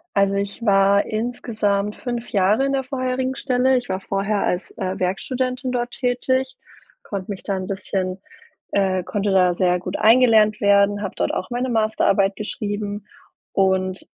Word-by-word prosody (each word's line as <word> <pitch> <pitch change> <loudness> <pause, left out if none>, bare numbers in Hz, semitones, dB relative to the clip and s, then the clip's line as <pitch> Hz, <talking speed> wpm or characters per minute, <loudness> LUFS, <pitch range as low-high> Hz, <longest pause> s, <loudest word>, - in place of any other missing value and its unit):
Also, 200 0 +3
ich 200 +3 -3
war 200 0 +4
insgesamt 215 -3 -1
5 240 -1 -5
Jahre 205 +6 +3
in 275 - 0
der 270 -1 0
vorherigen 255 0 -2
Stelle. 260 -1 +2
Ich 245 - -4
war 190 +1 -3
vorher 200 +1 -1
als, 180 +1 -2
äh, 190 0 -4
Werkstudentin 255 +7 -2
dort 245 -1 -2
tätig, 260 +1 -1 0.4
konnte 200 0 -6
mich 190 - -7
da 195 - -2
'n 185 0 -4
bisschen, 190 -1 -3 0.5
äh 190 -2 +1
konnte 205 +1 -1
da 180 -2 +3
sehr 180 -1 +2
gut 180 +1 -4
eingelernt 220 -2 +5
werden, 200 0 +3
habe 200 - -5
dort - - -1
auch 185 - -3
meine 250 +1 -2
Masterarbeit 215 -3 +2
geschrieben 205 -1 -4 0.5
und 190 -1 +1
205 Hz, 155 wpm, -21 LUFS, 195-245 Hz, 0.5 s, eingelernt